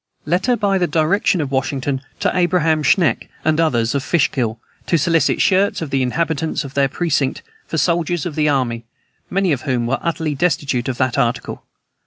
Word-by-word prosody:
Letter 185 Hz, +10 st, +1 dB
by 200 Hz, -3 st, +1 dB
the 175 Hz, -, +1 dB
direction 170 Hz, +3 st, +1 dB
of 140 Hz, -2 st, -4 dB
Washington 135 Hz, 0 st, -1 dB, 0.2 s
to -, -, +1 dB
Abraham 175 Hz, -3 st, +2 dB
Schenck 160 Hz, +3 st, +2 dB, 0.2 s
and 155 Hz, 0 st, +2 dB
others, 120 Hz, -7 st, +1 dB
of 140 Hz, -, 0 dB
Fishkill, 125 Hz, -9 st, 0 dB, 0.3 s
to 170 Hz, -, +3 dB
solicit 165 Hz, -1 st, +2 dB
shirts 195 Hz, +1 st, +2 dB
of 160 Hz, -4 st, -5 dB
the 135 Hz, -, +1 dB
inhabitants 160 Hz, +4 st, -1 dB
of 135 Hz, -1 st, -9 dB
their 140 Hz, -1 st, +2 dB
precinct 150 Hz, -4 st, -1 dB, 0.2 s
for -, -, -20 dB
the -, -, +1 dB
soldiers 170 Hz, -2 st, 0 dB
of 175 Hz, -, -3 dB
the 150 Hz, 0 st, +1 dB
army, 120 Hz, -5 st, 0 dB, 0.5 s
many 195 Hz, -2 st, +1 dB
of 135 Hz, -4 st, 0 dB
whom 125 Hz, -4 st, -1 dB
were 125 Hz, +3 st, -1 dB
utterly 160 Hz, -2 st, -1 dB
destitute 140 Hz, -5 st, 0 dB
of 130 Hz, -2 st, -3 dB
that 130 Hz, 0 st, 0 dB
article. 120 Hz, -2 st, -2 dB
150 Hz, 185 wpm, -19 LUFS, 135-170 Hz, 0.5 s, to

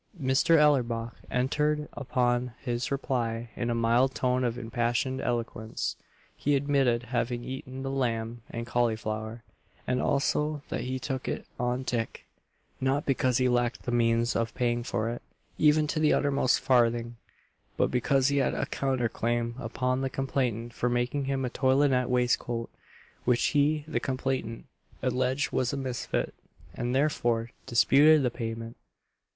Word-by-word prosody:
Mr. 135 Hz, +5 st, +4 dB
Ellerbach 120 Hz, -6 st, +2 dB
entered 150 Hz, +4 st, 0 dB
upon 125 Hz, -2 st, 0 dB
his 120 Hz, +2 st, -3 dB
reply 120 Hz, -4 st, -2 dB
in 120 Hz, -, -2 dB
a 120 Hz, -, 0 dB
mild 120 Hz, +3 st, +2 dB
tone 125 Hz, 0 st, +1 dB
of 120 Hz, -1 st, -1 dB
impassioned 120 Hz, +3 st, -1 dB
eloquence; 115 Hz, -2 st, -2 dB, 0.4 s
he 145 Hz, 0 st, +1 dB
admitted 135 Hz, -4 st, +2 dB
having 120 Hz, 0 st, -1 dB
eaten 130 Hz, 0 st, -6 dB
the 135 Hz, -, -2 dB
lamb 115 Hz, -3 st, -2 dB
and 115 Hz, 0 st, -5 dB
cauliflower, 110 Hz, -1 st, -1 dB, 0.4 s
and 125 Hz, 0 st, 0 dB
also 150 Hz, +1 st, 0 dB
that -, -, -2 dB
he 130 Hz, +1 st, -2 dB
took 130 Hz, 0 st, -4 dB
it -, -, -3 dB
on 125 Hz, +1 st, 0 dB
tick 115 Hz, -3 st, -3 dB, 0.5 s
not 135 Hz, +2 st, 0 dB
because 130 Hz, -2 st, +2 dB
he 130 Hz, -1 st, +3 dB
lacked 120 Hz, -1 st, 0 dB
the 120 Hz, -, -3 dB
means 115 Hz, 0 st, +2 dB
of 115 Hz, 0 st, -1 dB
paying 120 Hz, -2 st, +1 dB
for 115 Hz, -3 st, -2 dB
it, 120 Hz, +1 st, -4 dB, 0.4 s
even 150 Hz, 0 st, +5 dB
to 155 Hz, +1 st, -2 dB
the 155 Hz, -1 st, +4 dB
uttermost 140 Hz, -2 st, +2 dB
farthing; 120 Hz, -2 st, +2 dB, 0.6 s
but -, -, +2 dB
because 135 Hz, +2 st, +2 dB
he 140 Hz, -, +1 dB
had 135 Hz, -, +1 dB
a -, -, -1 dB
counter 130 Hz, -3 st, 0 dB
claim 115 Hz, +1 st, -1 dB
upon 125 Hz, +2 st, -1 dB
the 135 Hz, -, -1 dB
complainant 125 Hz, -4 st, -2 dB
for 125 Hz, -, 0 dB
making 120 Hz, +3 st, 0 dB
him 135 Hz, -1 st, -1 dB
a -, -, -1 dB
toilinet 130 Hz, -1 st, +2 dB
waistcoat, 120 Hz, -1 st, 0 dB, 0.5 s
which 120 Hz, -1 st, +2 dB
he, 150 Hz, 0 st, +2 dB
the 155 Hz, -, -1 dB
complainant, 130 Hz, -3 st, -3 dB, 0.4 s
alleged 130 Hz, +2 st, 0 dB
was 125 Hz, -1 st, 0 dB
a 140 Hz, -, -3 dB
misfit, 130 Hz, -, -2 dB, 0.4 s
and 120 Hz, +6 st, -2 dB
therefore 120 Hz, -5 st, +1 dB, 0.2 s
disputed 145 Hz, +5 st, +5 dB
the 125 Hz, -, +1 dB
payment. 115 Hz, -1 st, -5 dB
125 Hz, 150 wpm, -28 LUFS, 120-135 Hz, 0.6 s, even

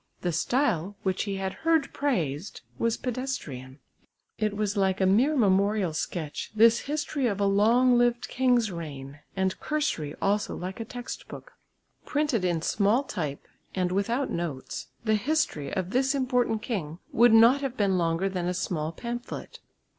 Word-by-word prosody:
The 175 Hz, -, 0 dB
style, 200 Hz, -, 0 dB
which 190 Hz, +1 st, 0 dB
he 200 Hz, -1 st, -2 dB
had 190 Hz, 0 st, -3 dB
heard 325 Hz, -3 st, +2 dB
praised, 175 Hz, -, -2 dB, 0.2 s
was 230 Hz, 0 st, +1 dB
pedestrian. 195 Hz, -, -4 dB, 0.6 s
It 215 Hz, -1 st, 0 dB
was 210 Hz, 0 st, -1 dB
like 190 Hz, -1 st, +1 dB
a 190 Hz, -, +3 dB
mere 240 Hz, +11 st, +4 dB
memorial 200 Hz, -4 st, +2 dB
sketch, 155 Hz, -1 st, -4 dB
this 230 Hz, +2 st, +6 dB
history 295 Hz, -3 st, -1 dB
of 205 Hz, -3 st, -1 dB
a 200 Hz, -, +2 dB
long 235 Hz, +5 st, +4 dB
lived 240 Hz, 0 st, +2 dB
king's 245 Hz, -4 st, +2 dB
reign, 145 Hz, -4 st, -7 dB, 0.2 s
and 190 Hz, -1 st, 0 dB
cursory 290 Hz, -, -2 dB
also 205 Hz, +1 st, 0 dB
like 185 Hz, +3 st, -6 dB
a 225 Hz, -, -4 dB
text 245 Hz, +2 st, -7 dB
book. -, -, -10 dB, 0.5 s
Printed 290 Hz, -8 st, 0 dB
in 170 Hz, -3 st, 0 dB
small 210 Hz, +9 st, +2 dB
type, 155 Hz, -, -5 dB, 0.3 s
and 180 Hz, -2 st, 0 dB
without 230 Hz, +8 st, 0 dB
notes, 165 Hz, -6 st, -4 dB, 0.2 s
the 215 Hz, -, +3 dB
history 215 Hz, -, 0 dB
of 185 Hz, -1 st, -2 dB
this 265 Hz, +3 st, +2 dB
important 250 Hz, -5 st, +1 dB
king 175 Hz, -, -3 dB
would 240 Hz, +1 st, +5 dB
not 230 Hz, +5 st, +6 dB
have 265 Hz, -2 st, -3 dB
been 195 Hz, -3 st, +2 dB
longer 165 Hz, +2 st, +1 dB
than 180 Hz, -2 st, -2 dB
a 180 Hz, -, -1 dB
small 160 Hz, -4 st, -2 dB
pamphlet. 240 Hz, +7 st, -6 dB
205 Hz, 160 wpm, -27 LUFS, 180-245 Hz, 0.6 s, this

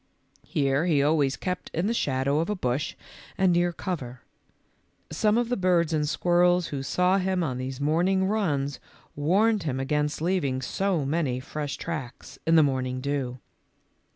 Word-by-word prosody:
Here 140 Hz, +3 st, +1 dB
he 145 Hz, -5 st, +3 dB
always 145 Hz, -2 st, +2 dB
kept 180 Hz, -1 st, -4 dB
in 165 Hz, +4 st, 0 dB
the 225 Hz, -, +1 dB
shadow 140 Hz, -, 0 dB
of 165 Hz, -, -1 dB
a 210 Hz, -, 0 dB
bush 135 Hz, -3 st, -2 dB, 0.4 s
and 190 Hz, -2 st, +3 dB
near 175 Hz, 0 st, +2 dB
cover. 135 Hz, -9 st, -5 dB, 0.9 s
Some 215 Hz, 0 st, +2 dB
of 240 Hz, -1 st, 0 dB
the 245 Hz, -, +1 dB
birds 175 Hz, -4 st, +2 dB
and 150 Hz, -1 st, +1 dB
squirrels 175 Hz, +2 st, +2 dB
who 140 Hz, -2 st, -3 dB
saw 180 Hz, +7 st, +2 dB
him 185 Hz, -1 st, 0 dB
on 130 Hz, -5 st, -2 dB
these 130 Hz, +1 st, -5 dB
morning 175 Hz, +6 st, +2 dB
runs 150 Hz, -10 st, -1 dB, 0.4 s
warned 200 Hz, +9 st, +2 dB
him 135 Hz, -5 st, -2 dB
against 150 Hz, +2 st, -1 dB
leaving 155 Hz, -6 st, 0 dB
so 185 Hz, +1 st, 0 dB
many 140 Hz, -4 st, 0 dB
fresh 145 Hz, +2 st, -5 dB
tracks 140 Hz, -7 st, -6 dB
in 165 Hz, -, +5 dB
the 160 Hz, -, +7 dB
morning 130 Hz, -2 st, -1 dB
dew. 135 Hz, -2 st, -2 dB
155 Hz, 160 wpm, -26 LUFS, 135-180 Hz, 0.9 s, the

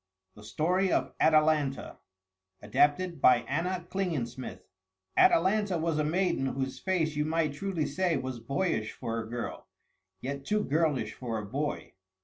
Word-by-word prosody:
THE 105 Hz, -, -14 dB
STORY 180 Hz, -, +1 dB
OF -, -, 0 dB
ATALANTA 155 Hz, -3 st, +2 dB, 0.6 s
ADAPTED 145 Hz, -, +2 dB
BY 125 Hz, -, +7 dB
ANNA 175 Hz, +5 st, -2 dB
KLINGENSMITH 130 Hz, -, -3 dB, 0.5 s
Atalanta 190 Hz, +1 st, +4 dB
was 160 Hz, -1 st, 0 dB
a -, -, +2 dB
maiden 170 Hz, -3 st, +1 dB
whose 130 Hz, 0 st, -3 dB
face 165 Hz, -5 st, 0 dB
you 150 Hz, -, +1 dB
might 155 Hz, -1 st, 0 dB
truly 175 Hz, 0 st, -2 dB
say 170 Hz, +3 st, 0 dB
was 130 Hz, -2 st, -4 dB
boyish 135 Hz, -, -1 dB
for 115 Hz, -2 st, -4 dB
a 110 Hz, -1 st, -6 dB
girl, 120 Hz, 0 st, -5 dB, 0.5 s
yet 140 Hz, +4 st, -5 dB
too 210 Hz, +8 st, 0 dB
girlish 155 Hz, -2 st, 0 dB
for 120 Hz, -3 st, -4 dB
a 105 Hz, -, -4 dB
boy. 145 Hz, +8 st, -3 dB
150 Hz, 140 wpm, -29 LUFS, 130-175 Hz, 0.6 s, BY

